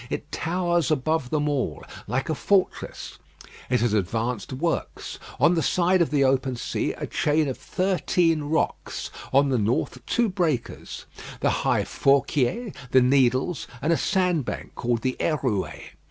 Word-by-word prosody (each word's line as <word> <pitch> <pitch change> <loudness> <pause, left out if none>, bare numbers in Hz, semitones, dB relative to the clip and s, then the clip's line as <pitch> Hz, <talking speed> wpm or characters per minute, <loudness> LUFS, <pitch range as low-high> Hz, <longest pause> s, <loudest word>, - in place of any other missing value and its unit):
It 150 - -5
towers 175 -2 0
above 155 -1 0
them 150 +1 0
all; 130 - -1 0.2
like 125 +5 -1
a 160 - 0
fortress, 190 +5 -1 0.5
it 125 -1 +2
has 120 -3 +2
advanced 110 +4 -1
works: 165 +6 -3 0.2
on 175 - +5
the 165 - +1
side 180 +2 +2
of 170 - +2
the 145 -2 +2
open 130 -1 +2
sea, 120 - -2
a - - -5
chain 150 0 +1
of 130 - -2
thirteen 180 -3 +1
rocks; 160 +2 -2 0.2
on 140 +1 +4
the 130 -3 +2
north, 115 +3 -1
two 240 -1 +2
breakers 170 - -2 0.4
the - - +3
High - - +1
Fourquiés, 140 - +1 0.2
the 130 +1 +5
Needles, 130 +3 +2
and 160 +6 +2
a - - +3
sandbank 180 - 0
called 120 -1 -1
the 130 -1 0
Hérouée. 130 - -1
140 Hz, 150 wpm, -25 LUFS, 125-170 Hz, 0.5 s, on